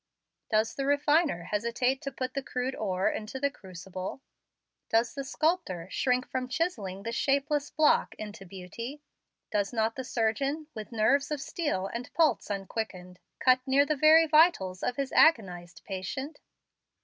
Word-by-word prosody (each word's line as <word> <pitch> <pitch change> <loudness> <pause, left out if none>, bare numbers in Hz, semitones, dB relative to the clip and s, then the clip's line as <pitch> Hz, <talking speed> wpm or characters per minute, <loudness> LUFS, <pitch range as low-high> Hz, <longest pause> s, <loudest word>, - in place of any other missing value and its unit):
Does 220 0 +2
the 275 0 -3
refiner 290 - +2
hesitate 235 +7 0
to 275 -3 -4
put 255 0 -4
the 275 - -2
crude 255 0 -3
ore 190 -5 -1
into 220 +5 -3
the 280 +1 +1
crucible? 190 +3 -8 0.7
Does 230 +2 +2
the 275 - -4
sculptor 270 - -1
shrink 255 -2 +1
from 255 -1 -3
chiselling 210 - -2
the 230 - -3
shapeless 280 +4 0
block 310 -1 +2
into 210 -2 -8
beauty? 200 +10 -8 0.5
Does 205 -1 0
not 225 -1 0
the 260 - -4
surgeon, 265 +6 -1
with 215 +1 -8
nerves 260 +6 +2
of 300 -2 -2
steel 285 - -2
and 235 +5 -6
pulse 320 -8 +2
unquickened, 195 -2 -5 0.2
cut 255 0 +4
near 275 +2 +4
the 305 +1 0
very 310 +3 +6
vitals 305 - +3
of 245 - -1
his 275 -1 -2
agonized 180 - +2
patient? 210 - -5
250 Hz, 150 wpm, -29 LUFS, 200-285 Hz, 0.7 s, very